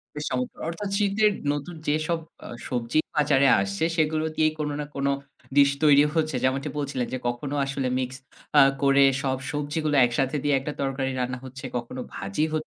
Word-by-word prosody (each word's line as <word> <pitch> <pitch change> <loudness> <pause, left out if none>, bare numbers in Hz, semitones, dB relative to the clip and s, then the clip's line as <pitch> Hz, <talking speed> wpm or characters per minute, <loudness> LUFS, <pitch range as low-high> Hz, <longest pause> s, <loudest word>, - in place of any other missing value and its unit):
বেশ 150 0 -4
চমৎকার! 125 0 -3
অর্থাৎ 195 +4 -4
শীতের 210 +1 +3 0.2
নতুন 145 +4 -5
যেসব 155 +3 0 0.3
আ - - -7 0.2
সবজি 120 +4 0 0.2
বাজারে 145 -2 +4
আসছে 100 +4 -2
সেগুলো 155 -1 +1
দিয়েই 155 0 +2
কোন 150 -1 -1
না 150 - -3
কোন 140 0 0 0.5
ডিশ 140 -1 +6
তৈরি 145 -1 +7
হচ্ছে। 155 -3 +1
যেমনটি 135 +3 0
বলছিলেন 135 -4 -2
যে, - - 0
"কখনো 135 +4 -3
আসলে 135 -1 -2
মিক্স 130 +1 -3 0.4
আ - - +10 0.2
করে 140 0 +5 0.2
সব 130 -2 0
সবজিগুলো 150 +1 -1
একসাথে 135 +4 0
দিয়ে 145 -1 +3
একটা 145 +2 -5
তরকারি 135 -1 -1
রান্না 125 0 -2
হচ্ছে, 135 +2 -9
কখনো 120 +2 -5
ভাজি 100 +10 -2
হ - - -6
140 Hz, 175 wpm, -25 LUFS, 130-155 Hz, 0.5 s, আ